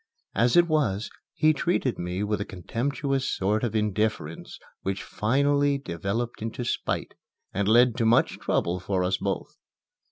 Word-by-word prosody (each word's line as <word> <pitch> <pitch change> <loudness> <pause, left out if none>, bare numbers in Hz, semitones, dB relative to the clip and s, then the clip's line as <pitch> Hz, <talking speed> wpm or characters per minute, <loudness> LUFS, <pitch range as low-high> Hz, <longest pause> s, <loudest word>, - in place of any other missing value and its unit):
As 120 - +3
it 175 0 +6
was, 120 - 0 0.2
he 155 0 +4
treated 150 -5 0
me 90 +3 -2
with 105 0 -1
a - - +1
contemptuous 135 - -2
sort 105 +4 0
of 115 -2 -1
indifference 105 -6 -1 0.2
which 95 0 -3
finally 140 +5 +2
developed 110 - -3
into 115 +2 -4
spite, - - -2 0.4
and 100 +1 0
led 120 +2 +5
to 115 - +1
much 115 - +3
trouble 90 +2 0
for 95 0 -1
us 95 +1 +1
both. - - -4
110 Hz, 150 wpm, -26 LUFS, 95-135 Hz, 0.4 s, it